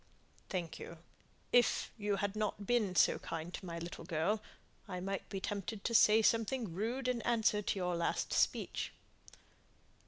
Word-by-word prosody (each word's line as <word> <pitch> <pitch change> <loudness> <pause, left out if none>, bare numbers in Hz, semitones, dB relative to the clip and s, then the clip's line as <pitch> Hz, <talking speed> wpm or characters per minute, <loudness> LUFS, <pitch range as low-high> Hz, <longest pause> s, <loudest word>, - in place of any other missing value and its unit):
"Thank 170 -3 -3
you. 170 - -8 0.6
If 245 -1 +4
you 205 -2 0
hadn't 205 +1 -2
been 215 -5 +1
so - - +5
kind 165 +2 -5
to - - -6
my 170 -1 -4
little 170 0 -6
girl, 170 +5 0 0.5
I 180 -2 -4
might 195 +1 -4
be 195 - -3
tempted 200 +1 -4
to 235 - -1
say 220 0 +6
something 230 -3 +1
rude 235 +8 -2
in 250 -2 0
answer 220 -2 +2
to 205 - -1
your 180 -1 0
last 170 0 -1
speech." - - 0
200 Hz, 155 wpm, -35 LUFS, 180-220 Hz, 0.6 s, say